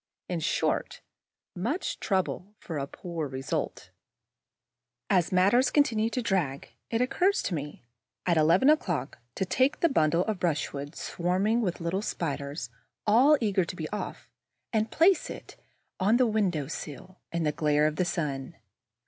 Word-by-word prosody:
In 175 -2 -2
short, 155 - -1 0.5
much 240 - -2
trouble 190 +1 -1
for 160 -4 -5
a 135 - -3
poor 165 -1 -5
result. 135 0 -4 1.2
As 180 -1 +3
matters 200 +8 +4
continue 225 -7 +2
to 250 +1 -2
drag, 175 -11 -1 0.2
it 230 +1 0
occurs 365 +10 +2
to 190 - -2
me, 145 -4 -5 0.4
at 175 - +3
eleven 165 - +4
o'clock, 170 - -1 0.2
to 190 - -1
take 260 +9 +2
the 335 - +3
bundle 170 - +2
of 215 -4 -2
brushwood 145 -3 -2
swarming 190 +7 0
with 185 -6 0
the - - -9
little 180 +4 -1
Spiders, 145 - -4 0.3
all 255 +8 +6
eager 200 -4 +2
to 175 - -6
be 155 -3 -4
off, 210 - -5 0.5
and 220 0 +1
place 385 +9 +3
it - - -9 0.4
on 210 +5 +4
the 255 - +4
window 195 - +1
sill, 155 +5 -8
in 170 -1 -1
the 150 - +2
glare 150 0 +2
of 155 0 0
the 180 - +2
sun. 150 -3 -3
180 Hz, 155 wpm, -28 LUFS, 155-220 Hz, 1.2 s, all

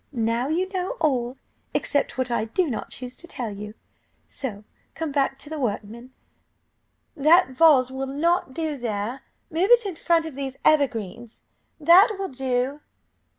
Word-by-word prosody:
Now 230 +1 0
you 345 +5 0
know 380 +5 -3
all, 255 -4 0 0.4
except 285 - 0
what 255 -1 -1
I 230 -2 0
do 335 +11 0
not 220 - -4
choose 250 0 -7
to 345 - -10
tell 245 -9 -4
you, 210 +1 -8 0.5
so 215 -7 -6 0.3
come 325 -2 -3
back 275 -1 0
to 280 - -6
the 310 - -4
workmen 235 +1 -4 1.0
'That 315 +4 +5
vase 260 -2 +5
will 265 +1 -4
not 300 +2 0
do 310 +1 -3
there, 235 +1 -3 0.3
move 345 +5 +1
it 480 -2 +6
in 385 -4 -3
front 330 0 +2
of 320 - -6
these 270 -1 -5
evergreens; 240 -6 0 0.4
that 355 +7 +6
will 390 -1 -3
do. 260 +2 -2
270 Hz, 155 wpm, -24 LUFS, 245-325 Hz, 1.0 s, it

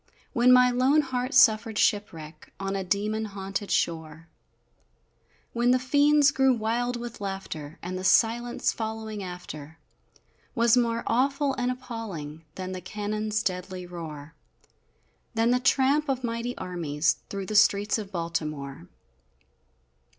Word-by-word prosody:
When 240 +1 +5
my 250 0 +6
lone 260 +5 +3
heart 255 -2 -3
suffered 220 0 +5
shipwreck 165 -7 -1
On 195 0 -2
a 195 - -2
demon 210 +4 -1
haunted 195 0 -5
shore 160 0 -2 1.2
When 240 +1 +2
the 255 - +5
fiends 285 +2 +4
grew 265 -2 +3
wild 235 +2 -1
with 235 -2 -8
laughter, 195 -6 -6
And 185 +1 -4
the - - -6
silence 235 +4 +2
following 220 -1 -5
after, 160 -4 -8 0.8
Was 235 0 +4
more 235 -1 +1
awful 275 +3 +1
and 250 -1 -1
appalling 210 - -7
Than 185 0 -5
the 185 -1 -5
cannons 215 +2 -2
deadly 185 -1 -3
roar 160 -3 -8 1.0
Than 225 +2 +3
the 250 - +3
tramp 275 +3 +2
of 260 -1 -1
mighty 235 +1 -3
armies 165 -4 -1
Through 195 -1 -4
the 215 - -4
streets 205 +1 +4
of 205 -2 -7
Baltimore! 155 - -4
215 Hz, 130 wpm, -27 LUFS, 180-245 Hz, 1.2 s, my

